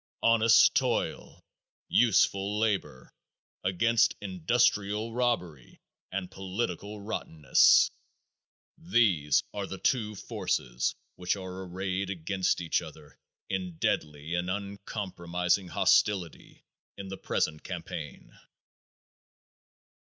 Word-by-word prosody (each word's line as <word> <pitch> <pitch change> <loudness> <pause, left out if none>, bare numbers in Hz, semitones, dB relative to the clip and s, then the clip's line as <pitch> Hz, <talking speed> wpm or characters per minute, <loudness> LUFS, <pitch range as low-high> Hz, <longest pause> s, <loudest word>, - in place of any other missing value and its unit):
Honest 115 0 +6
toil, - - -1 0.4
useful 100 -3 +3
labor, 100 - -2 0.5
against 110 +5 +2
industrial 105 +2 0
robbery 90 - -2 0.3
and 90 -1 -4
political 100 +1 -4
rottenness! 80 -9 +3 0.9
These 105 - +2
are 100 -1 -4
the 95 - -6
two 105 -1 0
forces 90 - -2 0.2
which 90 +1 0
are 95 -1 -7
arrayed 95 +1 -3
against 95 0 -1
each 85 - 0
other - - -12 0.3
in 90 -3 -4
deadly 75 +1 -2
and 90 +1 -1
uncompromising 95 -2 -2
hostility 90 -1 +1 0.3
in 100 -1 -7
the 95 - -6
present 75 -4 -2
campaign. - - -7
95 Hz, 90 wpm, -29 LUFS, 90-105 Hz, 0.9 s, Honest